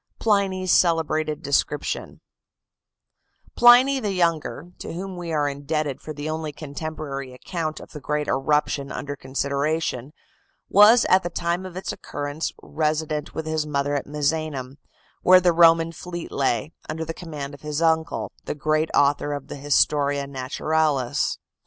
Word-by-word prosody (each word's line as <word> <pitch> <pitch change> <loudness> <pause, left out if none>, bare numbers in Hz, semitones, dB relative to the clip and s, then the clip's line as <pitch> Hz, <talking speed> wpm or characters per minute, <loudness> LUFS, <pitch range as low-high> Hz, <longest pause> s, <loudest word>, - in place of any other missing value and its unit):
PLINY'S 195 -4 +1
CELEBRATED 155 -3 +2
DESCRIPTION 145 +1 -1 1.3
Pliny 250 +3 +7
the 210 -5 -2
Younger, 170 -1 -1
to - - -6
whom 185 +2 -5
we 175 -2 -5
are 150 -2 +1
indebted 145 0 -2
for 155 - -7
the 150 0 -5
only 155 -1 -3
contemporary 145 -2 -6
account 155 +3 -4
of - - -12
the 150 - -8
great 150 +1 -2
eruption 140 +1 0
under 145 0 -5
consideration, 140 0 -2 0.6
was 215 +4 +7
at 185 - +5
the 175 - -4
time 170 +2 -2
of 180 -1 -10
its 190 - -3
occurrence 145 +2 -4
resident 155 -1 -2
with 160 - -3
his 155 -1 -1
mother 145 -1 -1
at 145 - -2
Misenum, 145 -2 -2 0.4
where 185 0 +7
the 175 -1 +3
Roman 165 0 +5
fleet 175 +1 -7
lay, 135 +2 0 0.2
under 160 +1 -3
the 165 - -4
command 150 -5 -7
of 140 - -12
his 150 0 -3
uncle, 160 -1 +1
the - - -3
great 155 +2 0
author 145 +1 +2
of 145 -2 -6
the - - -5
"Historia 145 0 +2
Naturalis". 140 0 0
155 Hz, 145 wpm, -24 LUFS, 145-165 Hz, 1.3 s, Pliny